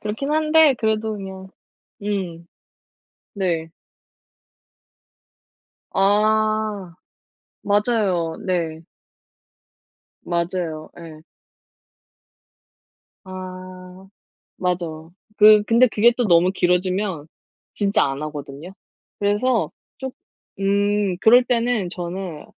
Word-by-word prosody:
그렇긴 220 +7 -4
한데 310 -1 +5
그래도 220 0 0
그냥 190 -1 -8 0.6
음. 180 -5 -3 0.9
네. 170 -5 -2 2.2
아. 215 -1 +1 0.7
맞아요. 205 -6 +1
네. 165 -3 -2 1.4
맞아요. 170 -2 -3
예. 160 -2 -11 2.0
아. 185 0 -10 0.5
맞아요. 170 -3 -3 0.2
그 210 0 +7
근데 235 +4 +4
그게 230 +2 +3
또 245 - 0
너무 175 +1 +4
길어지면 180 -2 0 0.5
진짜 200 -1 +2
안 135 +1 -3
하거든요. 150 +3 -7 0.5
그래서 210 +4 +1 0.3
좀 265 -1 -5 0.5
음. 200 -1 +1
그럴 245 +5 +6
때는 235 -5 0
저는 175 -2 -6
190 Hz, 145 characters per minute, -21 LUFS, 175-215 Hz, 2.2 s, 그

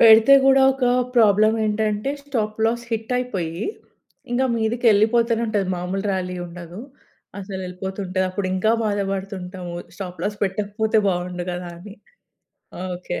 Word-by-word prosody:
పెడితే 225 +3 +8
గూడా 270 0 +6
ఒక 265 -1 -2 0.3
ప్రాబ్లమ్ 215 -1 +5
ఏంటంటే 215 +3 0
స్టాప్‌లాస్ 225 -3 -1
హిట్టయిపోయి 220 -7 -2 0.7
ఇంగా 260 +2 +2
మీదికెళ్ళిపోతూనే 230 0 +3
ఉంటది 205 -3 0
మాములు 180 +2 -3
ర్యాలీ 180 -1 -2
ఉండదు. 175 +2 -9 0.6
అసలు 190 -1 -6
ఎళ్ళిపోతుంటది 190 0 -3
అప్పుడు 185 0 -2
ఇంకా 215 +4 +2
బాధబడుతుంటాము 195 -3 -3 0.2
స్టాప్‌లాస్ 195 +2 -4
పెట్టకపోతే 210 +3 0
బాగుండు 180 -1 -2
గదా! 175 0 -5
అని. 200 +3 -11 1.0
ఓకే. 175 0 -5
205 Hz, 110 wpm, -22 LUFS, 185-225 Hz, 1.0 s, పెడితే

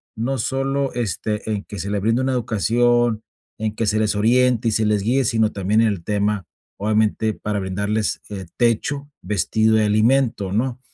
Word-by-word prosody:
no 125 +5 -2
solo, 135 +3 -1
este, 110 -2 -3
en 105 -2 -2
que 105 - -8
se 100 - -4
le 105 - 0
brinde 115 +5 +1
una 130 0 0
educación, 120 0 +1 0.4
en 110 -1 -2
que 115 - -1
se 105 +1 +1
les 110 -1 +1
oriente 120 +2 +3
y - - -1
se 110 0 +1
les 105 -1 +2
guíe, 130 +5 +2
sino 110 -1 +2
también 100 +3 +1
en 115 - +4
el 95 -5 -4
tema, 105 0 -1 0.3
obviamente, 110 +1 +1
para 105 0 -3
brindarles, 100 +3 -2
eh, 100 -2 -6
techo, 135 +5 0
vestido 110 +4 +1
y - - +3
alimento, 110 -1 +2
¿no? 120 +3 -1
110 Hz, 180 wpm, -21 LUFS, 105-120 Hz, 0.4 s, en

